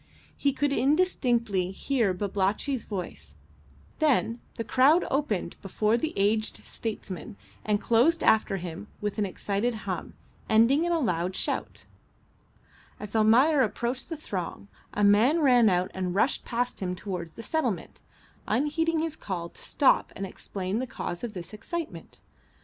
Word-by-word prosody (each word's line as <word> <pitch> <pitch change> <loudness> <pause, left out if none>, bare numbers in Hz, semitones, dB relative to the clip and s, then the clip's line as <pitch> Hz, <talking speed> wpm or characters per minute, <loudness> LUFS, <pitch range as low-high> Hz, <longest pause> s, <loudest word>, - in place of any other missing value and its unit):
He 280 - +1
could 285 +1 0
indistinctly 245 - +2
hear 225 +2 0
Babalatchi's 200 +7 -1
voice, 180 - -6 0.6
then 250 -6 +2
the 230 - -3
crowd 265 - +4
opened 245 -11 -1
before 210 +3 +1
the 310 +7 -1
aged 215 +2 0
statesman 205 - -5 0.3
and 210 -1 +1
closed 250 +10 +3
after 215 -3 +3
him 175 +3 -7
with 210 +1 -3
an 205 - +1
excited 205 +5 -1
hum, 185 -3 -4 0.3
ending 235 +9 +4
in 345 - 0
a 340 - +3
loud 180 - -1
shout. - - -3 1.1
As 210 +1 -7
Almayer 250 +7 +5
approached 240 +4 -1
the 325 - -4
throng 180 - -5 0.2
a 210 - -1
man 220 +11 +5
ran 250 -7 +5
out 180 0 +1
and 185 -1 -2
rushed 235 +7 +2
past 245 0 -2
him 180 -2 -2
towards 180 -4 -5
the 230 - -9
settlement, 315 +7 -2 0.5
unheeding 320 +3 +1
his 325 -2 -2
call 175 - -5
to - - -13
stop 275 - +3
and 195 - -4
explain 190 +2 -4
the 260 - -3
cause 175 -5 -5
of 230 -4 -5
this 175 +2 -8
excitement. 325 +10 -6
220 Hz, 145 wpm, -27 LUFS, 195-275 Hz, 1.1 s, Almayer